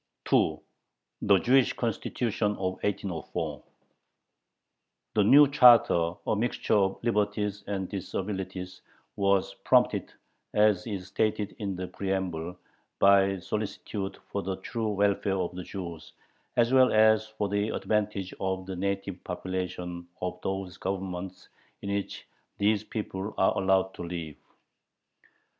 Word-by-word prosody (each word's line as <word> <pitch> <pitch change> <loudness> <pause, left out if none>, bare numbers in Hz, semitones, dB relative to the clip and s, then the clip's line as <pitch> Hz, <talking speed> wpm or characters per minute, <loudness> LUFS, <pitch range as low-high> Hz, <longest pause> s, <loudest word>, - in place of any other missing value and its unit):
THE 100 -1 0
"JEWISH 125 +5 +4
CONSTITUTION" 115 -2 -1
OF - - -9 0.2
1804 100 -5 -3 1.5
The 105 - +4
new 140 +8 +8
charter, 120 - +6
a - - +1
mixture 115 +4 -1
of 95 -2 +3
liberties 105 -2 0
and 95 -2 -2
disabilities, 95 -1 -5 0.3
was 100 -1 +2
prompted, - - +3 0.4
as 105 -4 +3
is 100 -4 -4
stated 105 +1 -1
in 100 -3 -3
the 90 0 -4
preamble, 90 -3 -3 0.4
"by 100 0 +5
solicitude 100 +1 -4
for 100 - -1
the 95 0 -3
true 115 +2 -3
welfare 100 -1 +1
of 90 -1 -2
the 90 - -6
Jews," 85 -5 -7 0.4
as 120 +1 +3
well 130 -1 +6
as 110 0 +5
for 110 -1 -3
"the 100 +2 0
advantage 105 -4 -1
of 95 -1 -2
the 95 0 -5
native 100 0 -3
population 90 -1 -4
of 90 0 -4
those 95 -2 -4
Governments 95 -1 -5 0.4
in 100 0 -2
which 100 -1 -4 0.3
these 105 0 +2
people 105 -2 -5
are 95 - +3
allowed 95 0 +2
to - - -9
live." 85 -3 -5
100 Hz, 120 wpm, -28 LUFS, 95-105 Hz, 1.5 s, new